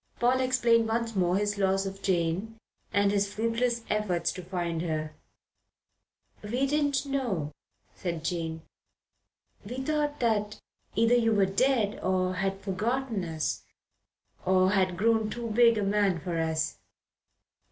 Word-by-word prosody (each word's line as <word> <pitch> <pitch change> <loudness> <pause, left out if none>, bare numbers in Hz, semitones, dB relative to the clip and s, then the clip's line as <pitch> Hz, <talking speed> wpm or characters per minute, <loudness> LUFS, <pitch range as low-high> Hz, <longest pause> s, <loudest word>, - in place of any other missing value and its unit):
Paul 250 +2 +3
explained 240 -3 +3
once 230 0 -1
more 180 -1 +2
his 205 0 -1
loss 195 0 +2
of 195 0 -6
Jane 185 +4 -1 0.3
and 200 0 +3
his 200 0 +1
fruitless 230 +2 0
efforts 210 -5 0
to 185 - -7
find 175 -2 -3
her. 155 -2 -3 1.3
"We 240 +6 -1
didn't 285 -1 +1
know," 235 - -2 0.4
said 170 -3 -4
Jane. 165 -2 -3 1.0
"We 220 +5 -7
thought 295 +2 -1
that 215 -3 0 0.4
either 230 +3 +4
you 230 -2 +3
were 200 -2 +4
dead 215 +2 +1
or 185 0 +1
had 195 +1 -2
forgotten 220 +2 -1
us 160 -2 -2 0.8
or 185 0 +3
had 185 -3 +1
grown 220 +1 +2
too 235 0 -4
big 230 0 +5
a 210 - 0
man 200 -3 +2
for 170 0 -3
us." 160 -1 -1
205 Hz, 135 wpm, -28 LUFS, 185-235 Hz, 1.3 s, big